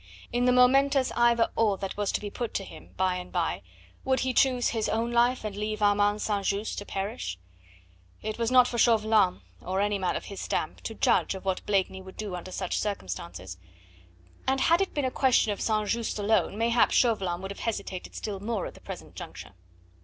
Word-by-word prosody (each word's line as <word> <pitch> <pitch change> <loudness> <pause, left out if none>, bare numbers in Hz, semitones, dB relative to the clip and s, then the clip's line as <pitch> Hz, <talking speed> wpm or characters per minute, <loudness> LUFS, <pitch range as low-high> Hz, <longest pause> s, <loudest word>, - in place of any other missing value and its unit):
In 245 +1 +2
the 250 - +5
momentous 265 +2 +4
"either 235 -1 +3
or" 210 -3 +2
that 195 0 -5
was 205 -1 -1
to - - +1
be 205 -1 -6
put 240 +1 -4
to 195 - -1
him, - - -13
by 185 -1 +1
and 180 0 -8
by, 170 - -1 0.4
would 260 0 +1
he 255 0 0
choose 250 -1 +3
his 225 -2 -1
own 230 +2 0
life 240 +1 +3
and 210 -2 -4
leave 210 +1 -3
Armand 205 0 +3
St. 205 -2 -1
Just 200 +2 -1
to 205 - -8
perish? 145 - -4 0.9
It 215 +1 -4
was 230 -1 +1
not 250 -1 +6
for 235 - -3
Chauvelin 215 - +3 0.2
or 185 +2 -2
any 205 0 +1
man 185 - 0
of - - -4
his 200 - -7
stamp - - -2
to - - -4
judge - - +2
of 190 - -9
what 190 -1 -1
Blakeney 190 -1 0
would 190 0 -12
do 210 -3 -4
under 180 +1 -7
such 185 -1 -2
circumstances, 90 - -5 0.9
and 265 0 +2
had 335 +3 +4
it 390 - -2
been 290 -2 0
a 255 - 0
question 250 -5 +3
of 205 - -4
St. 215 -1 +1
Just 230 +1 -1
alone, 210 0 +1
mayhap 230 +1 +3
Chauvelin 195 -8 +2
would 195 - -4
have 200 - -9
hesitated 200 -5 -4
still 200 -2 -4
more 215 -1 -2
at - - -7
the - - -16
present - - -9
juncture. - - -9
210 Hz, 210 wpm, -28 LUFS, 195-235 Hz, 0.9 s, not